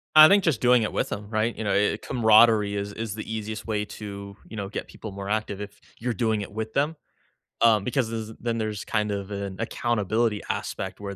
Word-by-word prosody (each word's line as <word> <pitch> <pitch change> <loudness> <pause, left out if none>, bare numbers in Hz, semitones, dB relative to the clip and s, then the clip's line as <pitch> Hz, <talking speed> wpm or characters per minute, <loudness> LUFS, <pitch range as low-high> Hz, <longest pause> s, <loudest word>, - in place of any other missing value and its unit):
I 155 0 +11
think 200 +1 +5
just 150 -10 +2
doing 125 -1 +5
it 110 - -1
with - - -1
‘em, 105 0 -5
right? 110 +1 0
You 110 - -4
know, 100 - +1
eh 105 +1 +3
eh, - - -3
camaraderie 110 -2 +4
is 100 0 -3
is 110 -1 -4
the 110 - -5
easiest 110 0 -5
way 105 -2 -1
to, 100 -1 -8
you 110 - -9
know, 100 -2 -3
get 100 - -5
people 110 - -9
more 100 0 -7
active 105 -2 -1
if 105 0 -8 0.2
you're 120 +1 -1
doing 110 -3 0
it 100 - -8
with 110 +1 -4
them, 150 +4 +1 0.7
um, 110 -3 +5
because 125 -2 0
this 110 -1 -4
then 115 -1 -1
there's 110 -2 -3
kind 105 -1 -1
of 100 0 -4
an 100 -1 -4
accountability 115 -1 0
aspect 95 +1 -3
where 100 -1 -6
110 Hz, 225 wpm, -26 LUFS, 100-115 Hz, 0.7 s, I